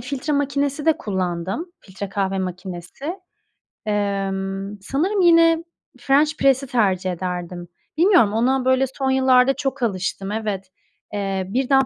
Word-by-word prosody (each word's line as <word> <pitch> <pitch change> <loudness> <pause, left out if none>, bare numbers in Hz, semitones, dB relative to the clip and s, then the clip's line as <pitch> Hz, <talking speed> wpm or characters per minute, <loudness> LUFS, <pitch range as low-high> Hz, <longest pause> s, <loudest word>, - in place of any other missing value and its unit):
filtre 270 +4 -3
makinesi 280 +1 -1
de 320 - +4
kullandım, 190 - -3
filtre 195 +1 -7
kahve 195 0 -1
makinesi. 180 +4 -6 0.8
Emm, 195 -1 -2
sanırım 350 - 0
yine 330 -1 +5 0.4
french 295 +3 +3
press'i 275 0 +3
tercih 190 -6 +1
ederdim. 175 0 -5 0.3
Bilmiyorum, 345 - +5
ona 255 +3 +1
böyle 260 +1 +3
son 265 +1 -2
yıllarda 260 0 +4
çok 270 -1 -3
alıştım, 195 -1 -2
evet. 210 -3 -3 0.4
Eee, 195 -2 -1
1'den 270 +3 +2
225 Hz, 120 wpm, -22 LUFS, 195-275 Hz, 0.8 s, yine